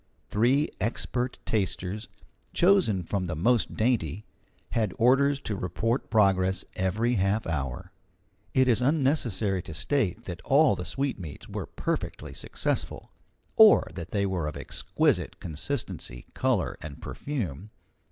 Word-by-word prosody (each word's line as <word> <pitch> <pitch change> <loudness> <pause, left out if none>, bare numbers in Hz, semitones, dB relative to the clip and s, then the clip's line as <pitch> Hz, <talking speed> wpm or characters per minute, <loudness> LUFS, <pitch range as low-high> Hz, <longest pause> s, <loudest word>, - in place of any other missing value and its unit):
Three 130 +8 +3
expert 120 +2 -1
tasters, 100 0 -1 0.5
chosen 175 - +4
from 95 +2 -2
the 85 - -3
most 115 +9 +2
dainty, 110 - 0 0.5
had 110 -5 0
orders 135 +4 +4
to 105 - -3
report 110 - -1
progress 95 -3 +3
every 105 +6 0
half 100 +3 +1
hour. 75 +3 -3 0.6
It 130 -1 +5
is 120 -1 +3
unnecessary 125 - +1
to 80 - -9
state 110 - 0
that 90 -1 -6
all 145 -5 +4
the 90 - -5
sweetmeats 105 - -4
were - - -5
perfectly - - -3
successful, - - -3 0.4
or 220 -1 +7
that 85 -2 -6
they 100 -1 0
were 90 -5 -1
of 75 - -5
exquisite - - 0
consistency, 90 - -4
colour, - - 0
and 75 -2 -8
perfume. 105 - -4
105 Hz, 125 wpm, -27 LUFS, 90-125 Hz, 0.6 s, or